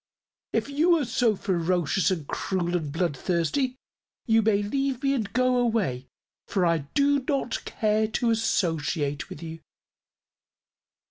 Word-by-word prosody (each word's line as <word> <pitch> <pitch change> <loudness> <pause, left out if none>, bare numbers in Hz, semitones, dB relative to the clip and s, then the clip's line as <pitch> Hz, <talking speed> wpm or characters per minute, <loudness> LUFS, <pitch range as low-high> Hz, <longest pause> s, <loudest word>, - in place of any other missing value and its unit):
If - - 0
you 320 +5 +3
are 295 - -1
so 235 -2 +2
ferocious 180 -2 +1
and 170 -6 -2
cruel 180 +2 -2
and 155 -5 -2
bloodthirsty, 175 - 0 0.5
you 225 -2 +4
may 205 -2 +2
leave 270 +4 -1
me 275 0 +2
and 220 -7 -2
go 255 +2 +2
away, 215 - 0 0.4
for 190 -3 +1
I 170 -1 +2 0.2
do 285 0 +4
not 275 -4 -1
care 215 0 +1
to 230 +2 0
associate 160 -9 0
with 155 - -9
you." 165 0 -7
205 Hz, 135 wpm, -26 LUFS, 170-250 Hz, 0.5 s, you